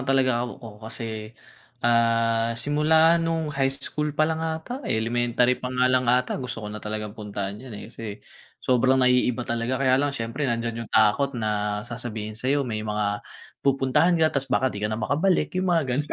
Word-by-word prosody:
talaga 130 Hz, -3 st, +3 dB
ako 115 Hz, -4 st, -11 dB
kasi, 110 Hz, -1 st, -6 dB, 0.5 s
ah, 115 Hz, -1 st, +2 dB
simula 160 Hz, +5 st, +4 dB
no'ng 165 Hz, -2 st, -1 dB
high 135 Hz, -1 st, +1 dB
school 150 Hz, +2 st, -1 dB
pa 155 Hz, -, +4 dB
lang 160 Hz, 0 st, -1 dB
ata, 160 Hz, -, -4 dB
eh, -, -, +1 dB
elementary 120 Hz, +2 st, +1 dB
pa 125 Hz, -, -3 dB
nga 125 Hz, 0 st, +2 dB
lang 125 Hz, -1 st, +2 dB
ata, 125 Hz, +2 st, +2 dB
gusto 125 Hz, -4 st, -5 dB
ko -, -, -4 dB
na 105 Hz, -, -6 dB
talagang 105 Hz, -1 st, -4 dB
puntahan 100 Hz, -1 st, -5 dB
'yon, 125 Hz, -5 st, -9 dB
eh, -, -, -8 dB
kasi, 105 Hz, -3 st, -6 dB, 0.5 s
sobrang 130 Hz, +1 st, +3 dB
naiiba 125 Hz, -1 st, +3 dB
talaga. 120 Hz, +2 st, -1 dB
Kaya 130 Hz, -1 st, +5 dB
lang 145 Hz, -, +1 dB
siyempre 130 Hz, +2 st, -3 dB
nandiyan 115 Hz, -1 st, -2 dB
'yong 115 Hz, -, -11 dB
takot 125 Hz, +6 st, +3 dB
na, 105 Hz, -2 st, -1 dB
sasabihin 115 Hz, -3 st, -5 dB
sa'yo 135 Hz, +5 st, +1 dB
may 110 Hz, -4 st, -3 dB
mga, 105 Hz, -1 st, -1 dB, 0.4 s
pupuntahan 135 Hz, +6 st, +3 dB
ka 160 Hz, -1 st, +3 dB
'tas 135 Hz, 0 st, 0 dB
baka 130 Hz, -, +2 dB
'di 100 Hz, -, -6 dB
ka 105 Hz, -, +1 dB
na 110 Hz, -, -2 dB
makabalik, 155 Hz, -, +1 dB
'yong 185 Hz, +1 st, 0 dB
mga 170 Hz, -2 st, +3 dB
gano' 145 Hz, +2 st, -2 dB
120 Hz, 185 wpm, -25 LUFS, 110-140 Hz, 0.5 s, Kaya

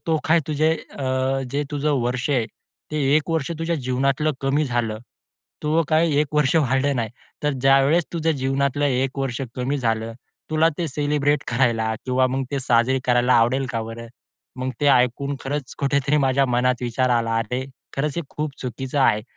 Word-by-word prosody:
तो 160 Hz, -, +2 dB
काय 165 Hz, +1 st, +4 dB
तुझे 155 Hz, +1 st, +2 dB, 0.3 s
अ, 135 Hz, -2 st, -2 dB, 0.4 s
जे 145 Hz, +2 st, 0 dB
तुझं 145 Hz, 0 st, 0 dB
वर्ष 125 Hz, +3 st, -1 dB
आहे, 125 Hz, -5 st, +1 dB, 0.4 s
ते 155 Hz, -, -3 dB, 0.2 s
1 155 Hz, +2 st, -1 dB
वर्ष 160 Hz, -2 st, -1 dB
तुझ्या 165 Hz, +1 st, -1 dB
जीवनातलं 135 Hz, +3 st, 0 dB
कमी 140 Hz, +3 st, +1 dB
झालं. 120 Hz, -5 st, -1 dB, 0.6 s
तूझं 155 Hz, +2 st, +2 dB
काय 160 Hz, +1 st, +3 dB
एक 150 Hz, -, 0 dB
वर्ष 150 Hz, -2 st, +2 dB
वाढलं 140 Hz, -1 st, +2 dB
नाही. 115 Hz, -3 st, -2 dB, 0.3 s
तर 150 Hz, -, +2 dB
ज्यावेळेस 135 Hz, +5 st, +4 dB
तुझ्या 165 Hz, -1 st, +1 dB
जीवनातलं 140 Hz, 0 st, 0 dB
1 135 Hz, 0 st, 0 dB
वर्ष 135 Hz, -2 st, -2 dB, 0.2 s
कमी 130 Hz, +3 st, -1 dB
झालं, 115 Hz, -2 st, -1 dB, 0.4 s
तुला 155 Hz, +1 st, +4 dB
ते 175 Hz, -, 0 dB
सेलिब्रेट 145 Hz, 0 st, 0 dB
करायला 115 Hz, -3 st, +1 dB
किंवा 130 Hz, 0 st, +2 dB
मग 135 Hz, +1 st, -1 dB
ते 140 Hz, -, 0 dB
साजरे 125 Hz, +1 st, +2 dB
करायला 125 Hz, 0 st, +3 dB
आवडेल 120 Hz, +4 st, +3 dB
का 115 Hz, -1 st, -1 dB
बरं?" 115 Hz, +1 st, -7 dB, 0.5 s
मंग 130 Hz, 0 st, -2 dB
ते 145 Hz, -, +2 dB
ऐकून 125 Hz, +3 st, +1 dB
खरंच 140 Hz, -1 st, -4 dB
कुठेतरी 140 Hz, +1 st, +1 dB
माझ्या 135 Hz, +1 st, +2 dB
मनात 125 Hz, +1 st, +1 dB
विचार 125 Hz, +1 st, 0 dB
आला, 115 Hz, -1 st, +1 dB
"अरे! 125 Hz, +3 st, -2 dB, 0.3 s
खरंच 145 Hz, +1 st, -1 dB
हे 170 Hz, -, -1 dB
खूप 150 Hz, -1 st, -3 dB
चुकीचं 130 Hz, +3 st, -4 dB
आहे," 110 Hz, -5 st, +3 dB
135 Hz, 175 wpm, -22 LUFS, 125-145 Hz, 0.6 s, काय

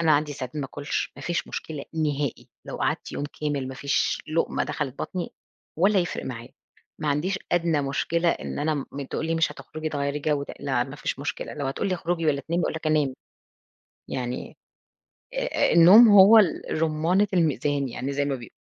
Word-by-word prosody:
أنا 160 Hz, -2 st, +4 dB
عندي 150 Hz, 0 st, +2 dB
ساعات 130 Hz, 0 st, -6 dB
ما 145 Hz, -, -2 dB
آكلش، 145 Hz, +2 st, -3 dB
ما -, -, -10 dB
فيش 175 Hz, 0 st, -2 dB
مشكلة 150 Hz, -3 st, -5 dB
نهائي. 145 Hz, -4 st, -2 dB, 0.2 s
لو -, -, -5 dB
قَعدت -, -, -2 dB
يوم 145 Hz, -, -3 dB, 0.2 s
كامل 145 Hz, -3 st, -1 dB
ما 130 Hz, -, -6 dB
فيش 140 Hz, +1 st, 0 dB
لقمة 165 Hz, +1 st, 0 dB
دخلِت 140 Hz, -4 st, -4 dB
بطني 180 Hz, -2 st, -4 dB, 0.5 s
ولا 195 Hz, +2 st, +4 dB
يِفرِق 175 Hz, -, -2 dB
معايا. 120 Hz, -2 st, -6 dB, 0.5 s
ما 150 Hz, -, -1 dB
عنديش 170 Hz, +7 st, 0 dB
أدنى 165 Hz, -4 st, +2 dB
مشكلة 165 Hz, +5 st, 0 dB
إن -, -, -2 dB
أنا 155 Hz, +1 st, +1 dB, 0.2 s
م 140 Hz, -, -5 dB
تقول 160 Hz, -, -2 dB
لي 165 Hz, -, 0 dB
مش 165 Hz, 0 st, +1 dB
هتخرجي 155 Hz, 0 st, -6 dB
تغيّري 140 Hz, -1 st, -2 dB
جو 145 Hz, -1 st, 0 dB, 0.2 s
لا 130 Hz, -4 st, 0 dB
ما 135 Hz, +2 st, -9 dB
فيش 140 Hz, -, -3 dB
مشكلة. 145 Hz, +2 st, -4 dB
لو 145 Hz, -2 st, -3 dB
هتقول 135 Hz, +8 st, -2 dB
لي 185 Hz, -, +1 dB
اخرجي 170 Hz, -1 st, -2 dB
والّا 140 Hz, -2 st, +2 dB
تنامي، 170 Hz, +5 st, -1 dB
أقول -, -, 0 dB
لك 160 Hz, 0 st, -5 dB
أنام 150 Hz, -4 st, +2 dB, 1.0 s
يعني 125 Hz, -1 st, -4 dB, 0.8 s
آآ -, -, -1 dB, 0.3 s
آآ -, -, +1 dB
النوم 190 Hz, +8 st, +9 dB
هو 205 Hz, +2 st, +9 dB
ال 170 Hz, -4 st, +2 dB
رمانة 165 Hz, +6 st, +2 dB
الميزان 145 Hz, -4 st, +1 dB
يعني 130 Hz, +3 st, -4 dB
زي 140 Hz, +1 st, 0 dB
ما 140 Hz, -1 st, -1 dB
بيق 120 Hz, -4 st, -10 dB
150 Hz, 190 wpm, -25 LUFS, 140-170 Hz, 1.0 s, النوم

